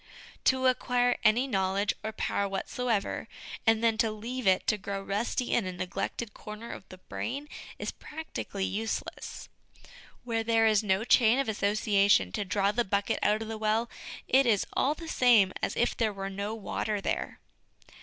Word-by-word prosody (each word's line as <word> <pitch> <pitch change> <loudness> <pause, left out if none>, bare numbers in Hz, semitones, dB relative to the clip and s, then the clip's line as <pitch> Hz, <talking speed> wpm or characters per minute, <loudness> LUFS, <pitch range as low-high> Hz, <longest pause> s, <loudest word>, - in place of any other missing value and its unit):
To 260 0 +3
acquire 245 -1 +2
any 230 +4 +4
knowledge 195 -3 +1
or 220 - -2
power 200 -2 -1
whatsoever, 215 +2 -2 0.4
and 225 0 +4
then 225 -1 +2
to 225 - +3
leave 230 +2 -4
it 185 -1 +4
to 215 - +1
grow 200 0 -4
rusty 205 +5 -2
in 215 -6 +2
a - - -2
neglected 185 +4 -4
corner 215 +2 -8
of - - -10
the 185 - -10
brain, 275 +9 -5 0.3
is - - -3
practically 300 -10 -5
useless. 220 +3 -4 0.8
Where 230 -2 -1
there 225 0 +3
is 215 -2 +4
no 195 -1 +1
chain 235 0 +5
of 275 - 0
association 200 - +3
to 205 - -2
draw 200 +1 +1
the 240 +3 +1
bucket 200 -1 0
out 210 +2 +2
of - - -8
the 220 0 -5
well, 220 +2 +1 0.4
it 265 0 +4
is 210 -4 +3
all 290 +3 +2
the 330 +1 -9
same 235 -10 +4
as - - -1
if 240 - +2
there 220 -2 +1
were 195 -1 -5
no 200 +3 -3
water 210 0 -2
there. - - -3
215 Hz, 175 wpm, -29 LUFS, 200-240 Hz, 0.8 s, chain